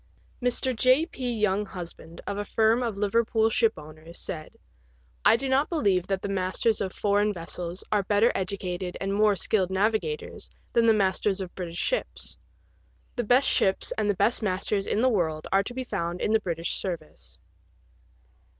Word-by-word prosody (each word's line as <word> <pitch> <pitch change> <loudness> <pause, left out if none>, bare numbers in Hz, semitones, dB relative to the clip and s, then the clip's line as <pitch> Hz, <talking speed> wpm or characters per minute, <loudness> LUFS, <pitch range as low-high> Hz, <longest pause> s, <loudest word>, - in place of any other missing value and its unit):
Mr. 250 +1 +1
J. 255 +7 +4
P. 250 -8 -4
Younghusband, 190 -5 -3
of 200 - -3
a - - -1
firm 220 +3 +2
of 230 -4 -2
Liverpool 220 +2 +2
ship 225 0 +3
owners, 155 +2 -11
said, 155 -3 -5 0.7
"I - - +6
do 270 +3 -2
not 265 +3 +2
believe 200 - +1
that 195 -1 -2
the - - -1
masters 195 +3 0
of 190 -2 -2
foreign 205 +1 +1
vessels 175 0 -5
are 210 -1 +3
better 205 +4 +3
educated 185 -1 -3
and 195 0 -2
more 210 0 +4
skilled 190 0 0
navigators 220 - -1 0.2
than 230 -1 +4
the - - +7
masters 195 0 +1
of 185 -2 -6
British 175 -2 -6
ships. - - -3 0.8
The 245 - -1
best 250 +5 +4
ships 190 0 +1
and 215 -1 0
the 205 - +2
best 205 +6 +2
masters 195 0 -1
in 220 - +1
the - - +5
world 160 -8 -1
are 195 - +4
to 220 +5 -6
be 260 - -2
found 170 -7 -3
in - - 0
the 220 - +5
British 170 -3 -2
service." 170 -5 -6
200 Hz, 170 wpm, -27 LUFS, 185-225 Hz, 0.8 s, the